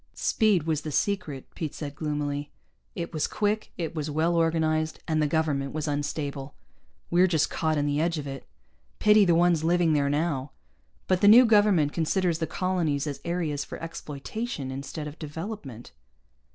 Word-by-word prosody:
"Speed 210 Hz, -7 st, +2 dB
was 155 Hz, -2 st, -1 dB
the 155 Hz, -, -5 dB
secret," 155 Hz, -6 st, -1 dB
Pete 155 Hz, -3 st, -5 dB
said 145 Hz, -2 st, -5 dB
gloomily. 145 Hz, -1 st, -3 dB, 0.5 s
"It 170 Hz, -1 st, -5 dB
was 155 Hz, -, 0 dB
quick, 210 Hz, +1 st, -1 dB
it 165 Hz, -2 st, -3 dB
was 155 Hz, -2 st, -3 dB
well 160 Hz, +3 st, +1 dB
organized, 160 Hz, -1 st, +1 dB
and 155 Hz, -1 st, +1 dB
the 150 Hz, -, +2 dB
government 145 Hz, -3 st, 0 dB
was 155 Hz, 0 st, -3 dB
unstable. 145 Hz, -1 st, -3 dB, 0.6 s
We're 180 Hz, +2 st, +5 dB
just 160 Hz, -4 st, +1 dB
caught 155 Hz, -1 st, 0 dB
in 145 Hz, -, +1 dB
the 145 Hz, +1 st, 0 dB
edge 165 Hz, 0 st, 0 dB
of 150 Hz, -, -4 dB
it. 135 Hz, -1 st, -7 dB, 0.5 s
Pity 210 Hz, -1 st, +5 dB
the 170 Hz, -2 st, +4 dB
ones 170 Hz, -2 st, +3 dB
living 170 Hz, -1 st, +3 dB
there, 140 Hz, -1 st, +2 dB
now. 145 Hz, -2 st, -1 dB, 0.5 s
But 185 Hz, -1 st, +1 dB
the 205 Hz, -, +5 dB
new 240 Hz, +5 st, +9 dB
government 205 Hz, -9 st, +4 dB
considers 170 Hz, 0 st, 0 dB
the 160 Hz, -, -1 dB
colonies 165 Hz, -5 st, -1 dB
as 145 Hz, -2 st, -5 dB
areas 165 Hz, -4 st, -2 dB
for -, -, -8 dB
exploitation 160 Hz, -, -5 dB
instead 140 Hz, +3 st, -6 dB
of 150 Hz, +1 st, -8 dB
development." 155 Hz, -, -7 dB
155 Hz, 170 wpm, -27 LUFS, 145-175 Hz, 0.6 s, new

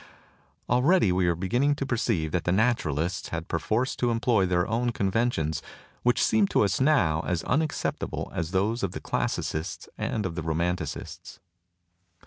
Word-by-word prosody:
Already 125 Hz, -, +4 dB
are -, -, +2 dB
we 90 Hz, -1 st, +2 dB
be 90 Hz, +3 st, -4 dB
ginning 140 Hz, +8 st, +2 dB
to 140 Hz, -, -3 dB
perceive 110 Hz, -, 0 dB
that 90 Hz, -1 st, -1 dB
the 90 Hz, -, +2 dB
Naturalists 90 Hz, -, 0 dB
had 85 Hz, 0 st, -4 dB
perforce 110 Hz, -, 0 dB
to 120 Hz, -, +1 dB
employ 115 Hz, -4 st, +2 dB
their 90 Hz, -1 st, +1 dB
own 120 Hz, +2 st, 0 dB
conventions, 95 Hz, -8 st, 0 dB, 0.4 s
which 125 Hz, 0 st, +2 dB
seem 110 Hz, -2 st, +3 dB
to -, -, +2 dB
us 100 Hz, +4 st, 0 dB
now 130 Hz, -, +3 dB
as 90 Hz, -2 st, -1 dB
unacceptable 155 Hz, +3 st, -2 dB
as 80 Hz, -1 st, -2 dB
those 100 Hz, +6 st, 0 dB
of 95 Hz, -3 st, -2 dB
the -, -, -5 dB
Classicists 80 Hz, +2 st, -3 dB
and 110 Hz, -, -1 dB
of 90 Hz, -, -2 dB
the 85 Hz, -, -4 dB
Romanticists. 80 Hz, -1 st, -3 dB
95 Hz, 160 wpm, -27 LUFS, 85-120 Hz, 0.4 s, Already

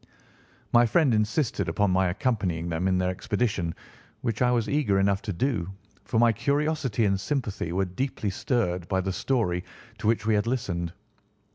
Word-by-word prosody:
My 120 Hz, 0 st, +6 dB
friend 135 Hz, +1 st, +3 dB
insisted 105 Hz, -, 0 dB
upon 95 Hz, +4 st, +1 dB
my 95 Hz, 0 st, +3 dB
accompanying 90 Hz, -, -1 dB
them 85 Hz, +3 st, -1 dB
in 95 Hz, -1 st, +2 dB
their 90 Hz, 0 st, +1 dB
expedition, 95 Hz, -3 st, -1 dB, 0.5 s
which 115 Hz, -1 st, -2 dB
I 125 Hz, -, +4 dB
was 120 Hz, -2 st, +1 dB
eager 140 Hz, -10 st, +1 dB
enough 100 Hz, 0 st, +2 dB
to 105 Hz, -, -4 dB
do, 100 Hz, -2 st, -1 dB, 0.4 s
for 115 Hz, -, -1 dB
my 120 Hz, 0 st, +6 dB
curiosity 140 Hz, -2 st, 0 dB
and 100 Hz, -1 st, +1 dB
sympathy 105 Hz, -, -2 dB
were 95 Hz, +2 st, +1 dB
deeply 105 Hz, +2 st, -3 dB
stirred 90 Hz, -, -1 dB
by 95 Hz, 0 st, +1 dB
the 95 Hz, 0 st, -2 dB
story 95 Hz, -8 st, 0 dB, 0.4 s
to 105 Hz, -, -2 dB
which 110 Hz, -1 st, +2 dB
we 110 Hz, -, +3 dB
had 105 Hz, +2 st, +1 dB
listened. 90 Hz, -9 st, -2 dB
105 Hz, 170 wpm, -26 LUFS, 90-120 Hz, 0.5 s, My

